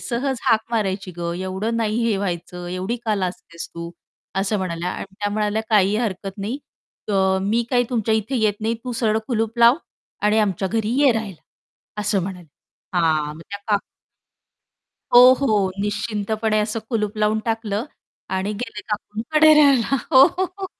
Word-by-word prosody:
सहज 260 +1 -2
हाक 220 -1 +3
मारायची 195 -4 -1
गं 170 0 -3
एवढं 190 +5 -2
नाही 220 -1 0
हे 225 -3 +2
व्हायचं, 180 -2 -4
एवढी 190 +6 -2
का 215 -2 +1
लाजतेस 180 -3 -5
तू?" 170 0 -6 0.5
असं 205 +2 0
म्हणाल्या 180 -1 -3
आणि 195 +1 -7
त्या 205 - 0
म्हणाल्या, 210 +1 0
"काही 205 -1 +4
हरकत 195 -3 -3
नाही, 220 +7 -3 0.5
तर 190 -2 +2
मी 225 +4 +1
काय 245 -1 +3
तुमच्या 225 -2 +1
इथे 220 +5 -1
येत 215 -2 +1
नाही 225 +2 0
तू 250 - -3
सरळ 220 -1 +3
कुलूप 225 -1 -1
लाव 235 +3 +7 0.5
आणि 210 +1 +3
आमच्या 195 -3 0
घरी 220 0 -1
ये 275 -4 +6
राहिला" 215 -6 -5 0.6
असं 205 -2 +1
म्हणाले. 180 -2 -6 0.5
हां. 155 -3 +2
मग 160 - -12
त्या 200 - -5
काक 205 -1 +3 1.3
हो, 250 +1 +10
हो. 210 -7 +2
निश्चिंतपणे 215 +1 -1
असं 215 +1 -1
कुलूप 210 -2 -1
लावून 215 +1 +2
टाकलं 225 -1 -2 0.5
आणि 190 +3 -1
गेले 210 0 -6
काकूंकडे 230 +9 +2
राहायला. 275 -3 +4 0.2
हो, 260 - +9 0.2
हो, 375 - +3
हो. 385 - -3
210 Hz, 160 wpm, -22 LUFS, 195-230 Hz, 1.3 s, हो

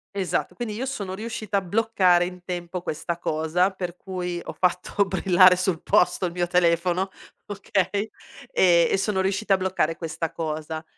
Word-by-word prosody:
Esatto. 180 -3 -2
Quindi 235 -3 -4
io 235 +5 -3
sono 205 -8 -4
riuscita 215 -1 -3
a - - +1
bloccare 185 -3 +2
in 180 0 -8
tempo 175 0 -5
questa 170 +1 -4
cosa, 160 +3 +1
per 180 -2 -5
cui 180 -2 -4
ho - - -7
fatto 180 +2 0
brillare 185 -1 +5
sul 180 -2 -1
posto 180 - +2
il 175 - -2
mio 175 0 -1
telefono, 175 +2 +2 0.4
okay, 200 +1 -1 0.4
e 170 -2 +4
e - - +3
sono 195 -1 0
riuscita 195 +1 0
a - - +4
bloccare 185 -4 0
questa 165 -1 -4
cosa. 155 0 -4
180 Hz, 165 wpm, -24 LUFS, 175-195 Hz, 0.4 s, brillare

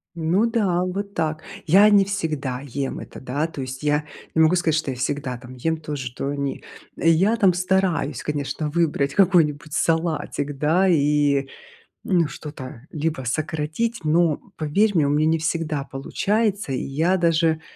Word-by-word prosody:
Ну 170 +7 +1
да, 190 -6 +1
вот 200 +2 -4
так. 155 -1 -2 0.2
Я 200 +6 +7
не 200 -1 +6
всегда 150 -10 -3
ем 135 0 -4
это, - - -10
да. 140 +5 -2
То 150 -4 -7
есть 130 +2 -6
я 150 0 +1 0.3
не 160 - +3
могу 160 +3 +5
сказать, 165 -3 +1
что 140 -3 -1
я 125 - -6
всегда 130 -1 -2
там 125 +1 -12
ем 160 +6 -1
то 150 -1 -6
же, 130 -3 -4
что 130 +3 -4
они. 140 -1 -3 0.3
Я 175 +7 +3
там 195 -6 +4
стараюсь, 180 -6 0
конечно, 150 0 -3
выбрать 145 -4 0
какой-нибудь 160 -5 +2
салатик, 160 -4 -1
да. 165 +7 +2
И 145 -4 +2 0.6
ну 175 -5 +2
что-то 135 -5 -9
либо 155 -3 -2
сократить, 155 - -2
но 160 0 +3 0.2
поверь 195 +8 +2
мне, 150 -3 +3
у - - +1
меня 150 +2 +2
не 165 0 +3
всегда 160 -3 -1
получается. 200 +7 -1
И 130 - -1
я 165 +7 +1
даже 165 -2 +2
155 Hz, 165 wpm, -23 LUFS, 140-175 Hz, 0.6 s, Я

